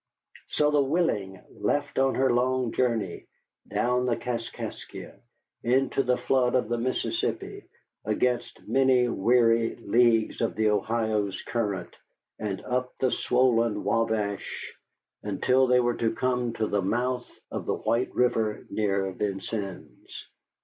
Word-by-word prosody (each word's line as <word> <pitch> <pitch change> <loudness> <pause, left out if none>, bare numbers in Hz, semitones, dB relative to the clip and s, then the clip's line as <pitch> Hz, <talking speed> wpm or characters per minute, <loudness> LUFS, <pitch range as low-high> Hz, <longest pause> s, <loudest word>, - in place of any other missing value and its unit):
So 150 0 +2
the 145 -1 +4
Willing 135 - 0
left 145 -1 -1
on 135 0 +3
her 130 -1 +3
long 125 0 +1
journey: 115 -8 -1 0.4
down 125 +1 +1
the 120 - +2
Kaskaskia, 115 -2 -6 0.5
into 130 +3 +2
the 125 -1 +1
flood 130 -2 +1
of 125 -4 +1
the 120 0 0
Mississippi, 130 +2 -2 0.4
against 120 +3 -1
many 130 -2 +3
weary 115 +1 +3
leagues 115 0 +2
of 115 - 0
the 110 -1 +2
Ohio's 105 -1 0
current, 105 -6 -3 0.4
and 100 -3 -3
up 125 0 -2
the 130 -1 +1
swollen 115 -4 +2
Wabash 105 -1 -1 0.5
until 125 +6 +2
they 125 0 +5
were 120 -1 +1
to 115 -1 0
come 125 -2 0
to 110 - -1
the 105 -1 0
mouth 120 +5 -1 0.2
of - - -5
the - - +1
White 120 +2 0
River 115 -4 +1
near 100 -2 0
Vincennes. 100 0 -5
120 Hz, 130 wpm, -27 LUFS, 105-125 Hz, 0.5 s, they